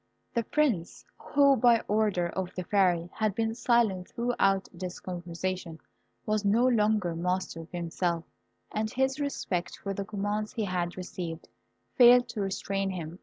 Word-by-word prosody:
The 235 Hz, -, +1 dB
Prince, 230 Hz, -, 0 dB
who, 280 Hz, -1 st, +3 dB
by 235 Hz, -1 st, +4 dB
order 205 Hz, -5 st, +1 dB
of 185 Hz, +1 st, -3 dB
the 185 Hz, -, -3 dB
Fairy, 180 Hz, -3 st, +2 dB
had 215 Hz, -3 st, 0 dB
been 225 Hz, -1 st, 0 dB
silent 230 Hz, -6 st, +1 dB
throughout 195 Hz, -5 st, +1 dB
this 180 Hz, 0 st, -6 dB
conversation, 175 Hz, -1 st, -4 dB, 0.5 s
was 215 Hz, 0 st, 0 dB
no 215 Hz, +5 st, +3 dB
longer 215 Hz, -7 st, +2 dB
master 180 Hz, 0 st, -2 dB
of 165 Hz, +1 st, -10 dB
himself, 170 Hz, -1 st, -2 dB, 0.5 s
and 215 Hz, 0 st, -1 dB
his 265 Hz, +2 st, 0 dB
respect 200 Hz, -11 st, -2 dB
for 195 Hz, -, -4 dB
the 200 Hz, -, -3 dB
commands 210 Hz, +1 st, -3 dB
he 220 Hz, -3 st, -1 dB
had 180 Hz, -2 st, -2 dB
received, 175 Hz, -2 st, -6 dB, 0.4 s
failed 245 Hz, 0 st, +7 dB
to 210 Hz, -, -4 dB
restrain 195 Hz, 0 st, -2 dB
him. 175 Hz, -1 st, -6 dB
195 Hz, 150 wpm, -29 LUFS, 180-225 Hz, 0.5 s, failed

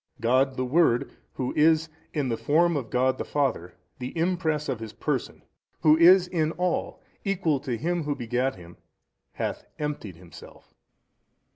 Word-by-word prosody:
A. -, -, -21 dB
God 130 Hz, +3 st, +3 dB
the 130 Hz, -, 0 dB
Word 125 Hz, -3 st, +2 dB, 0.2 s
Who 130 Hz, -1 st, -3 dB
is 160 Hz, +1 st, +4 dB, 0.2 s
in 145 Hz, -4 st, -1 dB
the 115 Hz, -, 0 dB
Form 170 Hz, +7 st, +2 dB
of 130 Hz, -6 st, -3 dB
God 130 Hz, +1 st, +1 dB
the -, -, -1 dB
Father, 125 Hz, -, -1 dB, 0.2 s
the 125 Hz, +5 st, -6 dB
Impress 165 Hz, -3 st, 0 dB
of 130 Hz, -5 st, -2 dB
His 110 Hz, -1 st, -7 dB
Person, -, -, -3 dB, 0.4 s
Who 155 Hz, 0 st, +6 dB
is 180 Hz, +3 st, +7 dB
in 160 Hz, -3 st, 0 dB
all 180 Hz, +1 st, -2 dB, 0.2 s
Equal 180 Hz, -8 st, 0 dB
to 130 Hz, -4 st, -3 dB
Him 170 Hz, +5 st, -1 dB
Who 145 Hz, -1 st, -1 dB
begat 125 Hz, +2 st, -1 dB
Him, 85 Hz, -1 st, -14 dB, 0.6 s
hath -, -, -3 dB
emptied 150 Hz, -, -4 dB
Himself. 85 Hz, 0 st, -15 dB
145 Hz, 160 wpm, -26 LUFS, 125-165 Hz, 0.6 s, is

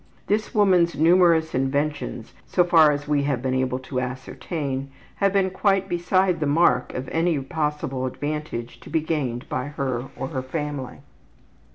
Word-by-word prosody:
This 215 Hz, +4 st, -1 dB
woman's 180 Hz, -6 st, +4 dB
numerous 165 Hz, 0 st, +4 dB
inventions, 135 Hz, -2 st, -2 dB
so 180 Hz, -, +3 dB
far 165 Hz, -4 st, +6 dB
as 145 Hz, 0 st, -3 dB
we 145 Hz, -1 st, +2 dB
have 140 Hz, -4 st, 0 dB
been 130 Hz, +1 st, -2 dB
able 130 Hz, -1 st, 0 dB
to 130 Hz, 0 st, -4 dB
ascertain, 135 Hz, +2 st, -4 dB, 0.3 s
have 200 Hz, -1 st, +2 dB
been 190 Hz, -1 st, +2 dB
quite 195 Hz, 0 st, +1 dB
beside 180 Hz, 0 st, +1 dB
the 150 Hz, -, 0 dB
mark 145 Hz, -4 st, +3 dB
of 130 Hz, +1 st, -4 dB
any 165 Hz, -1 st, +1 dB
possible 150 Hz, -3 st, -2 dB
advantage 145 Hz, -4 st, -5 dB
to -, -, -13 dB
be 160 Hz, 0 st, +1 dB
gained 140 Hz, -7 st, -2 dB
by 125 Hz, 0 st, -2 dB
her 135 Hz, -4 st, -3 dB
or 135 Hz, -, -4 dB
her 130 Hz, -5 st, -3 dB
family. 145 Hz, -1 st, -5 dB
150 Hz, 160 wpm, -24 LUFS, 130-170 Hz, 0.3 s, far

